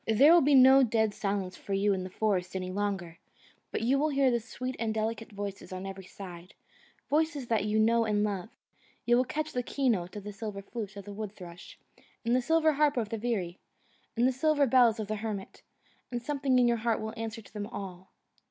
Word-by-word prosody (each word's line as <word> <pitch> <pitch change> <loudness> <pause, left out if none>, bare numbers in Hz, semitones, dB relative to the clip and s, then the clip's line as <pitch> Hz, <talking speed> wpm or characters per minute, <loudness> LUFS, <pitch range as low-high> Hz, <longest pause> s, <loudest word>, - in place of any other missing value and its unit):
There 270 +9 +6
will 345 - +7
be 285 +1 +4
no 265 +1 +8
dead 220 -3 +2
silence 195 -3 -2
for 200 - -6
you 200 +1 +2
in 185 -1 -2
the 185 - -6
forest, 190 -2 -1
any 185 -1 -3
longer, 190 -4 -3 0.5
but - - -2
you 265 +4 +3
will 305 +2 +2
hear 270 -4 +2
sweet 255 +2 -6
and 225 -1 0
delicate 220 0 -3
voices 200 -2 -6
on 185 +1 -5
every 195 -1 -7
side, 180 -2 -10 0.5
voices 300 -2 0
that 220 -3 +1
you 210 +1 0
know 230 +1 +3
and 210 -1 +1
love; 205 0 -2 0.6
you 240 - +4
will 250 +1 +3
catch 305 +4 -3
the 250 - 0
key 265 +2 0
note 180 -5 -1
of 205 - -6
the 210 0 -7
silver 200 -1 -6
flute 210 -1 -6
of 200 - -8
the 205 - -8
woodthrush, 195 -5 -9 0.5
and 235 +1 +3
the 255 - +3
silver 320 +3 +3
harp 290 -1 +2
of 225 -3 -1
the 225 - -3
veery, 200 -7 -2 0.6
and 240 +2 +4
the - - +3
silver 290 +2 +2
bells 240 -3 +4
of 215 - -3
the 215 0 -2
hermit; 205 -2 -5 0.5
and 240 -1 -3
something 275 -2 +1
in 245 -1 +5
your 235 0 +2
heart 230 0 0
will 220 0 -5
answer 225 0 -5
to - - -18
them 205 -1 -4
all. 190 -4 -8
220 Hz, 215 wpm, -29 LUFS, 200-250 Hz, 0.6 s, no